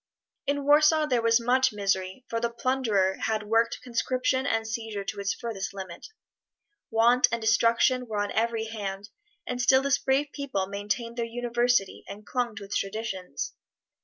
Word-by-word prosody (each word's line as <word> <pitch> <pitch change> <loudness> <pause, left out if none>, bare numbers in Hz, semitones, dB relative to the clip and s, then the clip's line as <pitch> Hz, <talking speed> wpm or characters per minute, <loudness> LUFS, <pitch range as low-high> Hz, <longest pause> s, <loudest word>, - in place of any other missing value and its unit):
In 285 0 0
Warsaw 305 +2 +5
there 250 -5 +1
was 230 +1 +4
much 255 +2 +3
misery, 195 +2 -2
for 230 - -2
the 235 0 0
plunderer 235 -6 +1
had 220 -1 0
worked 225 +2 +1
conscription 255 +2 0
and 225 -2 0
seizure 220 -3 -4
to 200 +1 -5
its 200 0 0
furthest 200 -4 -5
limit. 185 -3 -8 0.8
Want 235 +2 +4
and 230 - 0
destitution 230 +3 +3
were 215 -2 -4
on 205 0 -1
every 225 0 0
hand, 205 -2 -5 0.4
but 250 0 -3
still 260 +2 +5
this 280 0 +2
brave 275 +2 +1
people 265 -10 -2
maintained 210 +5 -3
their 235 - 0
University 240 -2 0
and 205 +2 -9
clung 240 -2 -2
to 200 - -7
its 200 +1 -2
traditions. 195 -6 -4
230 Hz, 160 wpm, -27 LUFS, 205-250 Hz, 0.8 s, Warsaw